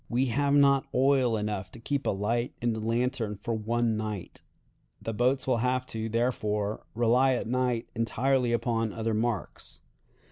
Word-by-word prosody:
"We 125 +2 +2
have 140 0 +2
not 140 -1 +4
oil 130 -3 +3
enough 105 -3 -3
to - - -10
keep 140 +4 -2
a - - +3
light 115 +5 -1
in 120 -1 0
the 110 - -4
lantern 115 -1 -1
for 105 +4 -4
one 115 +1 0
night. 105 -4 -5 0.6
The 115 - -4
boats 130 +4 +1
will 130 -2 +2
have 125 +2 0
to, 110 0 -3
therefore, 105 -3 -1
rely 125 +3 +3
at - - -3
night 125 0 0
entirely 125 +2 +1
upon 115 -2 0
other 115 0 -2
marks. 110 -2 -3
120 Hz, 165 wpm, -28 LUFS, 110-125 Hz, 0.6 s, not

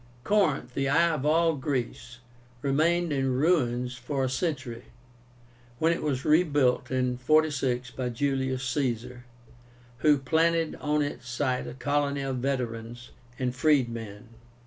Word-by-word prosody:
Corinth, 155 -11 +1
the 135 +1 0
"eye 170 +4 +4
of 150 -1 -2
all 165 +1 +3
Greece," 125 -3 -4 0.5
remained 160 +4 +2
in 135 -2 0
ruins 125 -5 +1
for 135 +2 -3
a 130 - 0
century, 130 -6 -3 0.9
when 165 +5 +3
it - - -4
was 140 -3 -2
rebuilt 145 -5 +3
in 125 -1 0
46 130 -3 +1
by 125 -1 -3
Julius 130 +1 -1
Caesar, 125 -2 -2 0.7
who 150 +1 +4
planted 165 +4 +1
on 150 0 +1
its 125 -4 -6
site 125 +1 -1
a 120 - -7
colony 140 +1 0
of 135 -1 -2
veterans 120 -2 -4 0.3
and 125 -1 -2
freedmen. 120 -7 0
135 Hz, 130 wpm, -27 LUFS, 125-150 Hz, 0.9 s, eye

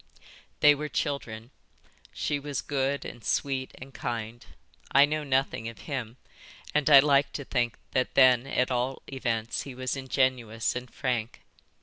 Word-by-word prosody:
"They 150 0 +8
were 150 +1 -4
children. 120 -6 -3 0.6
She 145 - -2
was 145 0 -4
good 140 0 -1
and 120 - -9
sweet 135 -2 -1
and 135 +1 -11
kind. 115 -1 -5 0.5
I 140 +1 +7
know 155 +1 -2
nothing 130 -4 0
of 115 -4 -12
him, 125 -5 -5 0.6
and 150 0 +2
I 140 -2 +10
like 140 -1 +3
to 140 - -5
think 120 -3 0 0.2
that 130 -1 0
then 130 -1 +6
at 125 -1 0
all 125 +2 -1
events 115 -4 -2
he 135 -3 -8
was 130 +1 -2
ingenuous 130 -5 0
and 125 0 -6
frank. 120 -4 -3
130 Hz, 150 wpm, -28 LUFS, 120-140 Hz, 0.6 s, I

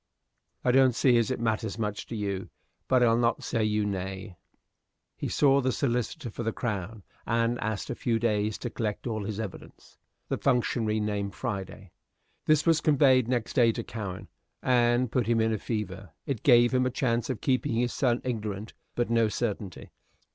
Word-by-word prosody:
I 125 - +4
don't 130 -1 +5
see 125 -1 +4
as 115 - 0
it 130 - -2
matters 110 -2 -1
much 105 -2 -3
to 115 - -5
you; 100 -3 -3 0.4
but 130 -1 +4
I'll 115 -1 +4
not 120 -1 +1
say 115 -2 0
you 105 -1 +1
nay." 95 0 -4 0.8
He - - -4
saw 140 -1 +4
the 130 0 +1
solicitor 120 -3 -2
for 120 - -6
the 115 -1 -1
Crown, 105 -3 -4 0.2
and 115 +1 +1
asked 110 +1 -3
a - - -1
few 120 -1 0
days 110 -2 0
to 120 - -5
collect 105 -3 -3
all 110 -4 -2
his 105 +1 -4
evidence. 110 -4 -9 0.3
The - - -2
functionary 120 -4 +1
named 100 -2 -2
Friday. 100 -4 -5 0.6
This 155 -1 +4
was 165 -2 +4
conveyed 135 -5 +4
next 120 -2 -1
day 120 -4 +5
to - - -4
Cowen, 100 -5 -6 0.4
and 120 -1 +3
put 125 -3 0
him 115 -1 +2
in 110 0 +2
a 110 - -2
fever; 95 -6 -5
it 135 -6 -3
gave 120 -2 +5
him 130 0 +3
a - - +1
chance 120 -1 -1
of 130 - -2
keeping 130 -3 0
his 120 +1 0
son 125 -2 +1
ignorant, 110 -4 -4 0.2
but 120 -1 -1
no 115 -1 +4
certainty. 105 -4 -4
115 Hz, 185 wpm, -28 LUFS, 105-125 Hz, 0.8 s, don't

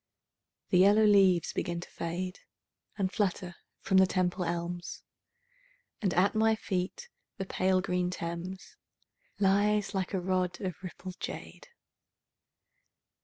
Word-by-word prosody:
The 180 - +5
yellow 205 +3 +6
leaves 195 -5 +4
begin 170 0 -2
to - - -10
fade 180 +2 -4 0.6
And 190 -2 0
flutter 180 -3 -1 0.2
from 190 -1 +2
the 190 0 +6
Temple 180 0 0
elms, 175 +1 -4 1.0
And 195 -4 +1
at 185 +3 +3
my 220 0 +3
feet 200 - -3 0.3
the 195 - -3
pale 185 0 +1
green 180 -1 0
Thames 180 +2 -6 0.6
Lies 205 +1 +2
like 190 0 -2
a - - +1
rod 180 -1 -1
of 185 -5 -5
rippled 185 0 -8
jade. - - -7
185 Hz, 120 wpm, -30 LUFS, 180-195 Hz, 1.0 s, yellow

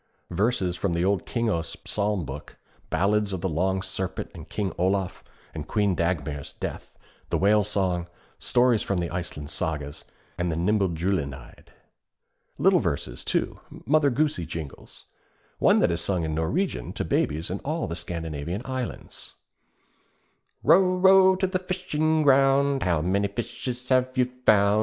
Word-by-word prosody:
Verses 95 -1 0
from 90 0 -1
the 85 +1 +1
old 100 -2 0
Kingos 110 -9 -1
Psalm 105 -4 -1
book, 70 +2 -8 0.3
ballads 105 +1 +1
of 90 - -3
the 95 - 0
Long 95 +3 0
Serpent 95 -1 -4
and - - -11
King 100 -4 -2
Olaf, 95 +1 0 0.3
of 75 -1 -6
Queen 105 -3 +1
Dagmar's 75 -5 -2
death, - - -7 0.3
the - - +1
Whale 105 +2 +4
Song, 95 -4 0 0.3
stories 120 -3 +3
from 100 - -1
the 85 -2 -2
Iceland 85 -4 -5
Sagas 75 -2 -3 0.4
and 90 -1 0
the - - -2
Nibelungenlied. 90 -5 -1 0.9
Little - - +4
verses, - - -3
too, - - -1 0.3
Mother 145 +2 +4
Goosey 135 - 0
jingles; 80 -4 -8 0.5
one - - +5
that - - +3
is 85 0 -1
sung 90 -2 0
in 80 -1 -2
Norwegian 80 - -1
to - - -3
babies 80 +4 0
in 95 - -3
all 155 +3 -2
the 85 - -4
Scandinavian 85 +1 -4
lands: 130 -1 -6 1.3
Row, 185 0 +5
row 190 0 +6
to 190 +1 0
the 185 0 -1
fishing 160 -4 0
ground, 135 0 +4
How 85 -4 +1
many 100 +3 +1
fishes 120 +4 -5
have 130 0 +2
you 125 - +4 0.2
found? 100 0 +5
95 Hz, 145 wpm, -26 LUFS, 85-125 Hz, 1.3 s, row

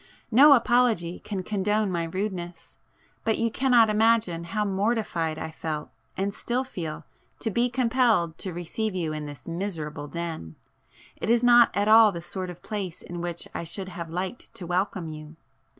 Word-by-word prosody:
[p - - -26 0.2
23] 225 - -5
No - - +10
apology 235 -8 +2
can 195 -3 -5
condone 210 +1 0
my 170 -2 -1
rudeness,—but 185 +3 -5
you 230 0 0
cannot 245 -2 +4
imagine 215 -5 +2
how 210 +5 -1
mortified 195 -6 -1
I 160 0 -5
felt 155 -1 -5 0.3
and 195 +1 -1
still 245 +4 -2
feel, 170 -12 -6 0.3
to 225 - -3
be 240 +5 +2
compelled 235 -9 +2
to 190 - -3
receive 180 +5 -3
you 165 -4 -2
in 150 -1 -5
this 145 -4 -10
miserable 165 -5 -4
den,—it 165 - -8
is 235 +1 +3
not 240 -1 +7
at 205 +1 +1
all 220 0 +8
the 170 - -5
sort 185 +1 -4
of 175 -1 -10
place 200 -6 -5
in 175 0 -6
which 170 -1 -4
I - - -4
should 185 +3 -4
have 170 -2 -7
liked 185 +7 -5
to 180 - -6
welcome 180 0 -1
you...." 155 0 -9
185 Hz, 170 wpm, -26 LUFS, 170-220 Hz, 0.3 s, No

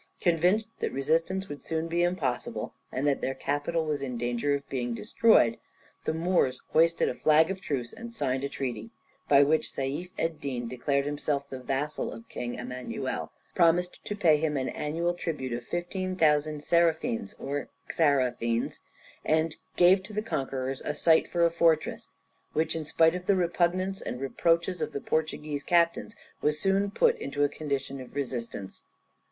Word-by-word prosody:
Convinced 180 +5 +3
that - - -1
resistance 165 +8 0
would 145 -3 -7
soon 160 0 -2
be 170 +1 0
impossible, 175 -8 -1 0.2
and 130 +3 -2
that 140 -2 +2
their 135 - -1
capital 145 +4 -1
was 150 -2 -1
in 125 -3 -3
danger 120 +4 0
of 140 0 -6
being 120 -3 -2
destroyed, 120 - +4 0.5
the - - +1
Moors 130 -8 +2
hoisted 165 +1 +3
a - - 0
flag 155 +6 +4
of 190 -1 -5
truce, 125 -8 -3
and 235 +1 -8
signed 135 - -1
a 140 - -1
treaty, 120 -6 -4 0.4
by 140 0 +7
which 155 +2 +2
Seif 140 +7 -3
Ed 165 -1 -2
din 125 -4 -3
declared 140 +3 0
himself 145 -1 -2
the 130 - -5
vassal 135 +4 -2
of 115 0 -10
King 120 0 -4
Emmanuel, 125 0 -4 0.2
promised 175 +1 +2
to 205 - -3
pay 165 -7 +4
him 150 -1 0
an 130 - -1
annual 165 +4 -1
tribute 150 -8 -3
of 120 0 -4
15,000 170 -5 0
seraphins 160 - +1
or 140 +1 -4 0.2
xarafins, 125 -6 +1 0.4
and 160 0 +1 0.2
gave 185 +2 +6
to 200 +3 -11
the 210 +1 -1
conquerors 135 -8 -3
a 150 - -3
site 160 -1 +4
for 170 -1 +2
a 170 - +3
fortress, 165 -2 +1 0.4
which, 160 +1 +1
in 160 -1 -3
spite 160 +2 +4
of 180 0 -5
the 200 - +5
repugnance 185 +2 +1
and 125 - -5
reproaches 170 +6 +1
of - - -2
the - - -2
Portuguese 155 -1 -2
captains, 170 +6 +2 0.3
was 150 +1 +1
soon 195 +2 +2
put 470 - +3
into 145 - -1
a - - +5
condition 140 -2 -3
of 130 - -12
resistance. 120 -8 -5
150 Hz, 170 wpm, -28 LUFS, 135-170 Hz, 0.5 s, by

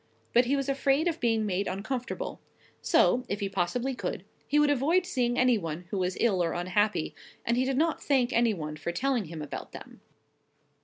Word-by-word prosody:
But 240 +1 +5
he 270 +4 +2
was 275 -1 -1
afraid 275 +3 +2
of 335 -1 -1
being 225 -3 +1
made 195 0 -1
uncomfortable; 245 - -4 0.4
so, 250 - +3
if 200 - -2
he 200 - -1
possibly 195 +8 -1
could, - - -4 0.2
he 295 - +2
would 295 -1 +5
avoid 315 +7 +2
seeing 245 -8 0
any 250 -3 +4
one 165 0 -5
who 200 - -1
was 180 0 -1
ill 195 -7 +2
or 165 - -1
unhappy; 185 +1 0 0.3
and 235 - +2
he 255 +1 +2
did 265 0 0
not 320 +2 +1
thank 265 -3 +2
any 230 -2 +3
one 155 -3 -5
for 155 +3 -3
telling 255 +3 0
him 160 -1 -7
about 145 - -7
them. - - -11
240 Hz, 200 wpm, -28 LUFS, 185-270 Hz, 0.4 s, But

